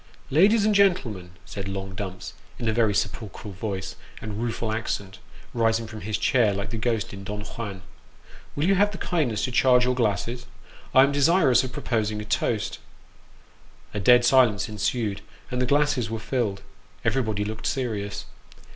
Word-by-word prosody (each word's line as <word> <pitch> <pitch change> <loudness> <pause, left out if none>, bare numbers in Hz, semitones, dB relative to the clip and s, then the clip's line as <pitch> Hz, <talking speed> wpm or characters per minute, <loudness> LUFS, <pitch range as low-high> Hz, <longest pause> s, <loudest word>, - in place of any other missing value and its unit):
"Ladies 200 +9 +5
and 215 - +3
gentlemen," 130 - +2 0.2
said 100 -1 -6
long 95 0 -5
Dumps, 95 -2 -6 0.2
in 115 - -3
a 110 - +2
very 110 -3 +2
sepulchral 100 0 -3
voice 95 -1 -4 0.2
and 105 0 -5
rueful 115 -1 -2
accent, 100 -3 -3 0.3
rising 115 -1 +1
from 110 -1 -9
his 110 0 -2
chair 115 -8 +2
like 100 +3 -4
the 115 - -3
ghost 110 -2 -1
in 100 0 -8
Don 105 +1 -5
Juan, 100 -3 -7 0.7
"will 145 - 0
you 195 - +4
have 205 +2 +4
the 200 - -7
kindness 135 - -1
to 130 - -1
charge 125 0 +4
your 125 - +2
glasses? 120 +1 -1 0.5
I 130 - +9
am 140 - +3
desirous 145 -3 +4
of 130 - -5
proposing 110 -4 -1
a 105 - -6
toast." 105 - -1 1.1
A 105 - -2
dead 120 +4 +6
silence 120 -6 +4
ensued, 105 0 -2 0.3
and 125 0 -1
the 125 - +1
glasses 145 -4 +2
were 115 - -3
filled 110 -4 -2 0.4
everybody 110 -3 0
looked 110 +1 -4
serious. 105 -6 -3
115 Hz, 165 wpm, -25 LUFS, 105-130 Hz, 1.1 s, I